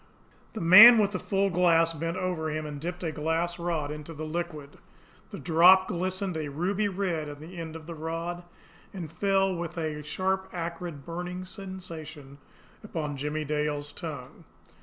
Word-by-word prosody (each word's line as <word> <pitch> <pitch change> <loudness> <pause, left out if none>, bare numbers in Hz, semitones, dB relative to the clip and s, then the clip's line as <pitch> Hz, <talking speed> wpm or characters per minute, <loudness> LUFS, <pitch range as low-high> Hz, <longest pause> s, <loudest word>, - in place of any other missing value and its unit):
The 220 - -5
man 210 +8 +10
with 205 -2 +3
the - - -3
full 195 -1 0
glass 165 -2 +3
bent 165 +2 -3
over 180 -4 -2
him, 155 0 -3
and 145 -1 -7
dipped 175 +2 -5
a 165 - -1
glass 165 +3 -1
rod 165 -4 -2
into 150 +2 -8
the 155 +1 -5
liquid. 155 -3 -5 0.5
The - - -7
drop 180 +3 +5
glistened 185 +1 -2
a 155 -2 -3
ruby 185 +8 -1
red 180 -6 -2
on 145 0 -9
the 170 +3 -9
end 160 -1 -6
of 160 -1 -9
the 170 - -7
rod 165 +2 -4 0.5
and 165 -5 -6
fell 195 +2 +1
with 170 0 -5
a 155 -2 -3
sharp, 190 +5 -2
acrid, 170 -4 -5
burning 180 +2 -5
sensation 165 -8 -9 0.4
upon 155 -8 -4
Jimmie 150 +2 -3
Dale's 150 0 -2
tongue. - - -8
170 Hz, 165 wpm, -28 LUFS, 155-185 Hz, 0.5 s, man